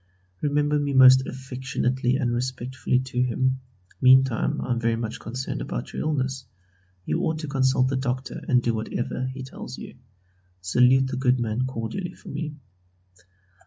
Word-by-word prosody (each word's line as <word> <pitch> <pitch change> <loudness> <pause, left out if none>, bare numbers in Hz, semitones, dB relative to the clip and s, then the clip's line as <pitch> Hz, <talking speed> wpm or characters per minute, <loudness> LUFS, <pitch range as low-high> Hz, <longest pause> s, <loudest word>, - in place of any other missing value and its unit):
Remember 145 0 +1
me 145 -1 -1
most 130 0 +7
affectionately 130 -1 -1
and 125 -4 0
respectfully 130 +1 -1
to 130 -1 -2
him. 130 +1 +1 0.4
Meantime 130 -2 +4
I 125 - -3
am 120 - +1
very 115 -1 +1
much 115 -1 -4
concerned 120 - -5
about - - -5
your - - -3
illness. 130 -4 -2 0.6
You 75 - 0
ought 160 - 0
to 155 - -5
consult 130 -2 +2
the 135 - 0
doctor 130 0 -3
and 125 -1 +3
do 120 - +1
whatever 120 +3 -3
he 130 0 -6
tells 130 - -8
you. - - -10 0.6
Salute 125 +8 +4
the 130 -1 -3
good 130 -1 +2
man 120 +2 -1
cordially 130 - -4
for - - -13
me. 150 0 -4
130 Hz, 160 wpm, -25 LUFS, 125-130 Hz, 0.6 s, most